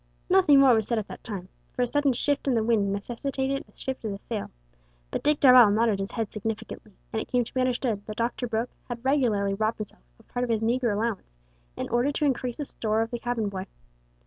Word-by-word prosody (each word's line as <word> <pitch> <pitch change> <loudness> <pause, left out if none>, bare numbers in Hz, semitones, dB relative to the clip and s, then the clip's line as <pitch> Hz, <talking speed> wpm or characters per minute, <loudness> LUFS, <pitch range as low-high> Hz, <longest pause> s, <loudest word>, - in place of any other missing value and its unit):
Nothing 365 -7 +6
more 270 -2 +7
was 220 -2 +1
said 235 - 0
at 215 - -2
that - - -9
time, 195 -5 -6 0.3
for 250 - 0
a - - +3
sudden 285 +2 +2
shift 285 +3 -1
in 260 - +3
the 225 - +2
wind 215 -3 +2
necessitated 265 +6 -2
a - - -33
shift 265 -2 -5
of 220 - -2
the 200 - -4
sail, 210 0 -5 0.6
but - - -2
Dick 300 0 +2
Darvall 250 -5 +8
nodded 215 -1 +2
his 195 0 -3
head 225 -3 -2
significantly, 220 0 -5 0.2
and 220 - 0
it - - -7
came 245 -1 +2
to - - -12
be 255 - +1
understood 245 -4 0
that 215 - -5
"Doctor" 240 +1 -1
Brooke 230 +1 -2 0.2
had 240 +1 -6
regularly 230 -8 +2
robbed 215 +3 0
himself 210 - -8 0.2
of - - -23
part 245 - -2
of 250 - -2
his 225 -1 +1
meagre 240 +2 +1
allowance 205 - -3 0.4
in - - -3
order 240 +4 +2
to 300 - 0
increase 250 -3 -1
the 295 - -3
store 220 -3 0
of 225 - -7
the 240 - -3
cabin 235 -3 -1
boy. 190 -1 -5
235 Hz, 235 wpm, -27 LUFS, 215-255 Hz, 0.6 s, Darvall